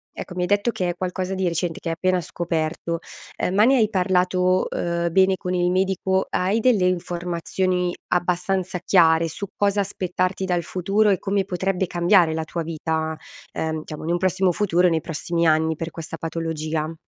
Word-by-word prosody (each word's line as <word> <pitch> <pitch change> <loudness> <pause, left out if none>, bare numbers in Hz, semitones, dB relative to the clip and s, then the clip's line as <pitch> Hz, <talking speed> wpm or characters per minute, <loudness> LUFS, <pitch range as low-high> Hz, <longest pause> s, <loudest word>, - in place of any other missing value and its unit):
ecco, 180 - -7
mi 180 - -2
hai - - 0
detto 205 +4 +2
che 180 -4 -2
è 175 - -3
qualcosa 185 +1 -3
di 190 -1 0
recente 170 0 -2
che - - -7
hai 165 - -1
appena 185 +1 +1
scoperto. 165 0 -2 0.4
Ehm, 185 - -1
ma 210 - +5
ne 265 +1 +5
hai 215 -3 +3
parlato, 185 -1 +2
uhm, 170 0 -1
bene 190 +1 +4
con 180 0 -3
il 175 0 +2
medico? 190 0 +1
Hai 195 +5 +1
delle 220 -6 +3
informazioni 180 +1 -1
abbastanza 180 +1 0
chiare 165 -3 +5
su 200 +6 -5
cosa 205 0 +1
aspettarti 185 -1 -2
dal 175 -2 0
futuro 195 +5 +1
e 190 - +3
come 195 -1 0
potrebbe 190 0 -1
cambiare 175 -1 +3
la 160 - -2
tua 170 +1 -4
vita, 160 0 -2 0.4
ehm, 160 0 -2
diciamo 155 0 -8
in 170 - -1
un 175 - +2
prossimo 185 0 +2
futuro, 180 -1 +2
nei 160 -1 0
prossimi 170 +1 -1
anni 160 0 +2
per 165 +2 -5
questa 160 0 -7
patologia? 160 -1 -3
180 Hz, 185 wpm, -23 LUFS, 165-190 Hz, 0.4 s, ma